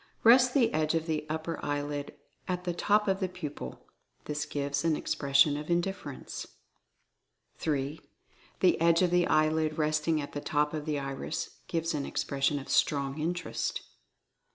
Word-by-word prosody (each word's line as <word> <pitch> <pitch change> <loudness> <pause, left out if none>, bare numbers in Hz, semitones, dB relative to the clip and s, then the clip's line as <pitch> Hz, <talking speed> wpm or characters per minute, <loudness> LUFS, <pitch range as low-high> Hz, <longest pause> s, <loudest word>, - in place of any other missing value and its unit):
Rest 250 +3 +7
the 240 -5 +4
edge 155 +1 +1
of 160 -1 0
the 155 -2 -2
upper 160 +1 -3
eyelid 145 0 -3 0.3
at 180 -1 -2
the 175 -1 -1
top 210 +4 +2
of 190 0 +1
the 190 -2 -1
pupil. 150 - -7 0.4
This 150 0 -3
gives 140 0 -2
an 165 -2 +2
expression 140 0 +3
of 150 +2 -6
Indifference. 170 -5 -3 1.1
3. 145 0 -2 0.6
The 180 -3 +4
edge 170 +1 +5
of 180 - +2
the 175 -1 +3
eyelid 155 0 +2
resting 155 +1 +1
at 145 - -5
the 145 - -4
top 150 0 0
of 150 -2 -3
the 150 -1 0
iris 135 -1 -4
gives 165 0 -1
an 145 -2 -2
expression 140 +1 0
of 140 - -7
Strong 140 0 +1
Interest. 175 +3 -2
155 Hz, 155 wpm, -30 LUFS, 145-170 Hz, 1.1 s, Rest